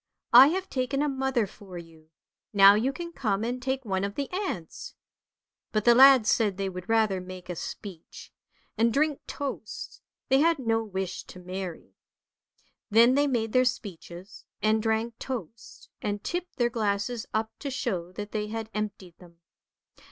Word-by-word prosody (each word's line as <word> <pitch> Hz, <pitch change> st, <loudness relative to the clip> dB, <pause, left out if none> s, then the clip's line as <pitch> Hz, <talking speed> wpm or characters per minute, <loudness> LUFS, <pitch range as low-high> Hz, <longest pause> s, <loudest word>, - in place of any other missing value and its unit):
" -, -, -43 dB
I -, -, +6 dB
have 375 Hz, +5 st, -1 dB
taken 275 Hz, 0 st, -1 dB
a -, -, +1 dB
mother 265 Hz, -4 st, 0 dB
for 195 Hz, -2 st, -11 dB
you, 165 Hz, -2 st, -13 dB, 0.4 s
now 200 Hz, 0 st, +8 dB
you 230 Hz, +6 st, +1 dB
can 340 Hz, +4 st, -7 dB
come 215 Hz, -8 st, -1 dB
and 245 Hz, +2 st, -3 dB
take 265 Hz, 0 st, -2 dB
one 190 Hz, -2 st, -1 dB
of 200 Hz, +1 st, -3 dB
the 280 Hz, -1 st, -3 dB
aunts." 365 Hz, -, -5 dB, 0.8 s
But 215 Hz, -1 st, -1 dB
the 240 Hz, -, +7 dB
lads 260 Hz, -2 st, +7 dB
said 210 Hz, -5 st, +1 dB
they 195 Hz, -1 st, -2 dB
would 185 Hz, +1 st, -8 dB
rather 215 Hz, -4 st, +2 dB
make 185 Hz, 0 st, -10 dB
a -, -, -5 dB
speech, 180 Hz, 0 st, -9 dB, 0.5 s
and 230 Hz, +1 st, +4 dB
drink 295 Hz, +3 st, +1 dB
toasts: 275 Hz, -7 st, -6 dB, 0.3 s
they 265 Hz, +1 st, +4 dB
had 330 Hz, +2 st, +3 dB
no 225 Hz, -3 st, 0 dB
wish 190 Hz, -3 st, -4 dB
to -, -, -12 dB
marry. 180 Hz, -1 st, -7 dB, 1.0 s
Then 230 Hz, +4 st, +6 dB
they 285 Hz, +2 st, +3 dB
made 225 Hz, -5 st, -1 dB
their 255 Hz, -, +5 dB
speeches, 190 Hz, -5 st, -5 dB, 0.2 s
and 215 Hz, +1 st, +2 dB
drank 225 Hz, +1 st, -1 dB
toasts 230 Hz, -4 st, -7 dB
and 205 Hz, 0 st, -3 dB
tipped 355 Hz, +1 st, -4 dB
their 240 Hz, -1 st, +1 dB
glasses 220 Hz, +1 st, -1 dB
up 220 Hz, 0 st, -1 dB
to 285 Hz, -, -4 dB
show 190 Hz, -10 st, -3 dB
that 205 Hz, +2 st, -7 dB
they 210 Hz, -1 st, -2 dB
had 225 Hz, 0 st, -5 dB
emptied 200 Hz, -4 st, -5 dB
them. 170 Hz, -2 st, -17 dB
220 Hz, 170 wpm, -27 LUFS, 195-255 Hz, 1.0 s, now